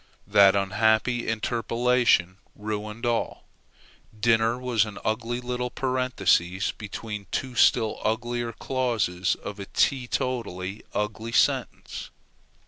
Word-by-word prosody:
That 100 -1 +6
unhappy 110 +5 +2
interpolation 115 -3 +1 0.2
ruined 105 +2 -5
all. 120 -1 -1 0.8
Dinner 115 +1 +3
was 125 -4 +1
an 105 -2 -7
ugly 115 +2 -1
little 125 0 -3
parenthesis 105 -8 +1
between 105 -1 -7
two 130 +6 -3
still 115 -2 +3
uglier 120 +1 -1
clauses 115 -8 0
of 105 0 -8
a 100 - -6
tee 130 -3 +1
totally 105 -7 -3
ugly 110 +2 -3
sentence. - - 0
115 Hz, 105 wpm, -26 LUFS, 105-120 Hz, 0.8 s, That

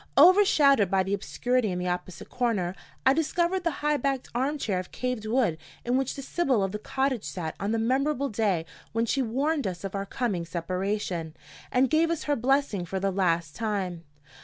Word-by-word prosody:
Overshadowed 290 - +6
by 190 0 +3
the 190 +1 -2
obscurity 245 +3 0
in 180 - -2
the 180 0 -2
opposite 180 -1 -4
corner, 220 -8 -1 0.3
I 265 - +6
discovered 345 +4 0
the 340 - +2 0.2
high 300 0 +3
backed 275 -1 -1
arm 270 +5 0
chair 200 -9 -1
of 180 - -7
carved 250 -3 -3
wood 220 -9 +1 0.3
in 245 +1 +1
which 265 0 0
the 275 - -6
Sibyl 265 - +1
of 195 - -1
the 210 - -4
cottage 265 -1 -1
sat 165 -4 -4
on 200 +2 -1
the 230 - +1
memorable 275 +4 +1
day 200 -6 0 0.3
when 230 +1 +1
she 270 +4 +1
warned 275 +4 0
us 180 -1 -5
of 195 - -4
our 195 0 -3
coming 205 -9 -1
separation, 180 -1 -3 0.4
and 255 +1 +4
gave 320 +4 +3
us 335 -2 -1
her 290 - +1
blessing 265 -5 +1
for 190 +3 -3
the 195 +1 0
last 170 -5 0
time. 195 -6 -2
225 Hz, 195 wpm, -27 LUFS, 185-275 Hz, 0.4 s, Overshadowed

